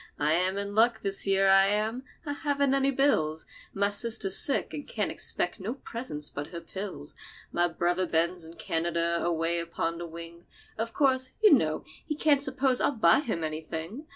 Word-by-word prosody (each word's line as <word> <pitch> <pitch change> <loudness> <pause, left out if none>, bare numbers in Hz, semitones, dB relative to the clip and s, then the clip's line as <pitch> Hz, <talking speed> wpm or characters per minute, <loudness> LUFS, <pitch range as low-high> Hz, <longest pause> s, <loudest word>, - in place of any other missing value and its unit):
I 150 +1 +2
am 185 +3 +1
in 200 0 -4
luck, 220 +1 +3
this 195 0 +2
year, 195 0 +3
I 195 0 +6
am. 215 +4 -1 0.2
I 290 - -2
haven't 280 -2 0
any 275 0 +2
bills. 160 - +1 0.3
My 200 +1 +1
sister's 205 -2 +3
sick, 275 - +1
and 290 - -6
can't - - -2
expect - - -2
no 215 +6 -4
presents 230 - -4
but 145 +1 -6
her 170 - -7
pills. 180 -6 -7 0.4
My 175 0 +2
brother 175 +2 -1
Ben's 170 +2 0
in 165 +1 -9
Canada, 170 +1 -1
away 170 0 0
upon 170 0 -3
the 175 - -5
wing. 170 +1 -10 0.3
Of 225 +1 -3
course, 260 0 +1
you 425 - +8
know 155 - +2 0.2
he 305 - -3
can't 295 -2 +3
suppose 265 -2 +1
I'll - - +3
buy 215 -1 +4
him 220 - -3
anything. 160 - -5
195 Hz, 180 wpm, -28 LUFS, 170-255 Hz, 0.4 s, you